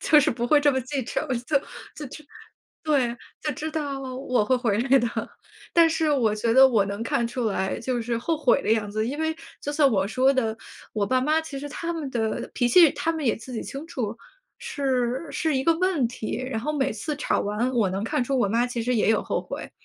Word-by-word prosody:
就 300 - +5
是 - - +2
不 240 0 -2
会 295 +4 +5
这 290 0 +4
么 260 - 0
记 260 +2 -3
仇。 - - -2 0.3
就 290 - +2 0.5
就 305 +4 -11 0.6
对， 270 -6 +1 0.3
就 300 - -1
知 310 +3 -4
道 285 -3 -3
我 255 -3 -1
会 255 +4 +2
回 225 -4 0
来 270 +3 +4
的。 240 - 0 0.6
但 335 -1 +6
是 320 -1 +1
我 235 -7 +2
觉 225 +2 0
得 265 +2 +8
我 225 -6 +3
能 200 +2 -4
看 230 +1 0
出 245 +1 -3
来 190 -2 -1
就 250 -2 -2
是 235 0 -1
后 325 +7 -1
悔 280 -3 +3
的 - - -1
样 210 -2 0
子。 215 +1 -1
因 285 +5 -4
为 320 0 -1 0.2
就 290 - -3
像 295 -2 +4
我 195 -2 +1
说 260 +4 +3
的， 225 -4 0 0.4
我 205 -2 0
爸 255 0 +2
妈 305 +4 +2
其 300 -3 -7
实 290 +1 -6
他 335 +4 -4
们 310 -5 -4
的 225 -3 -2
脾 245 -1 +2
气， 330 +3 +7
他 330 - -1
们 315 -2 -4
也 230 - +2
自 230 +3 -10
己 230 - -3
清 280 +3 -7
楚， 230 -8 -4 0.4
是 270 - -1
是 315 -3 0
一 260 - 0
个 330 +1 +4
问 365 -9 +2
题。 230 -2 -4
然 225 - -2
后 300 +6 -2
每 275 -3 0
次 300 +7 -4
吵 295 - 0
完 210 +5 -1
我 230 -6 +2
能 195 +1 -2
看 230 +2 0
出 270 +2 -1
我 205 -5 +2
妈 235 +3 +2
其 240 -2 -3
实 250 +2 0
也 215 - +2
有 220 - +3
后 - - -1
悔， - - -7
255 Hz, 255 characters per minute, -25 LUFS, 230-295 Hz, 0.6 s, 得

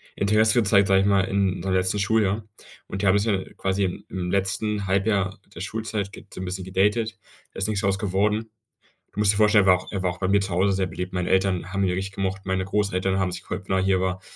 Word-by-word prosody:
Interesse 110 +3 +3
gezeigt, 100 -2 +4
sage 95 0 +4
ich 100 - +1
mal, 100 -1 +4
in 95 -1 0
seinem 95 -1 -1
letzten 95 +2 +1
Schuljahr. 105 0 +1 0.4
Und 95 - -5
die - - +3
haben 95 +2 +5
sich 110 +1 0
dann 95 -1 -3
quasi 95 +1 0
im 90 - -4
im 90 -1 -3
letzten 100 +1 -1
Halbjahr 100 -1 0 0.2
der 85 - -7
Schulzeit, 105 0 -3
ge - - -12
so 90 - -7
'n - - -4
bisschen 95 +1 -4
gedatet. 105 +4 0 0.4
Da - - -8
ist 95 - 0
nichts 105 -1 -1
draus 100 -1 0
geworden. 105 +3 0 0.6
Du - - -6
musst 105 -1 +4
dir 100 - -3
vorstellen, 105 -2 +5
war 95 -1 +6
auch 90 - -11
er 100 - -3
war 90 - +1
auch 90 - -10
bei 95 - 0
mir 100 +1 +3
zu 95 - -3
Hause 95 +3 +2
sehr 95 -1 0
beliebt. 90 +2 -6
Meine 90 -1 -1
Eltern 95 -1 +1
haben 100 - 0
ihn 90 - +1
richtig 95 +2 -4
gemocht. 95 0 -3
Meine 95 0 -1
Großeltern 95 -1 0
haben 95 -1 0
sich 90 - -6
gefreut, 90 +2 -5
wenn 95 - +1
er 95 - +1
hier 95 -1 +2
war. 95 0 -2
95 Hz, 255 wpm, -24 LUFS, 95-100 Hz, 0.6 s, war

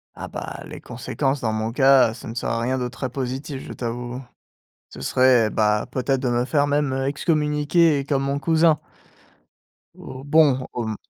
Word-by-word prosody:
Ah, - - -7
bah, - - -7
les - - -9
conséquences 135 0 -3
dans 110 -2 0
mon 110 +1 -2
cas, 135 -3 +5
ça 115 - -10
ne 115 - -7
serait 115 0 -2
rien 130 +2 0
de 125 -1 -2
très 130 +1 -5
positif, 135 +2 -5
je - - -7
t'avoue. 120 +1 -5 0.7
Ce 70 - -12
serait, 125 - +3
bah 105 -1 +1
peut-être 130 0 -1
de 130 - -1
me 120 0 +1
faire 145 +1 +1
même, 145 -2 +1
heu, 135 0 -1
excommunier 150 0 +1
comme 135 -1 0
mon 140 +1 -1
cousin 160 0 +3 1.2
ou 130 +1 -10
bon, 145 -3 +3
au 120 -2 -3
m 110 - -3
130 Hz, 180 wpm, -22 LUFS, 120-145 Hz, 1.2 s, cas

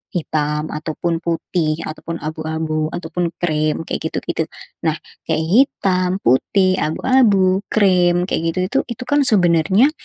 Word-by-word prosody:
hitam 150 -2 -1
ataupun 160 +2 -3
putih 165 -1 -2
ataupun 160 +2 -6
abu-abu 155 0 -2
ataupun 175 +1 -2
krim 155 -2 0
kayak 160 - -3
gitu-gitu. 160 0 -3 0.3
Nah, 160 -2 0 0.3
kayak 160 0 0
hitam, 185 -2 +2
putih, 185 +9 +2
abu-abu, 195 0 +3
krim 180 -4 +3
kayak 180 - -1
gitu-gitu, 185 +8 0
itu, 245 +1 -6
kan, 290 +3 +2
sebenarnya, 190 - +4
170 Hz, 120 wpm, -19 LUFS, 155-185 Hz, 0.3 s, sebenarnya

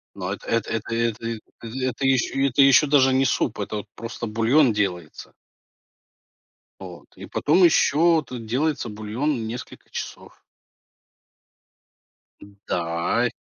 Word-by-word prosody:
Но - - -4
эт - - -10
эт 115 -2 0
это 115 +1 -3
это, 115 -1 -1
э, 115 -1 -3 0.2
это 130 +3 -3
еще 135 +1 +2
это 135 +1 +2
еще 135 +2 +6
даже 135 -2 +4
не 135 +1 +3
суп, - - 0
это 105 - -3
вот 105 - -6
просто 115 0 -6
бульон 115 +4 +3
делается. 90 -6 -3 1.5
Вот. - - -11
И - - -9
потом 170 +5 +2
еще 165 0 +4
тут 120 -3 -8
делается 135 +4 -1
бульон 110 +5 -3
несколько 120 +2 -9
часов. - - -8 2.3
Да. 85 +8 0
120 Hz, 125 wpm, -23 LUFS, 110-135 Hz, 2.3 s, еще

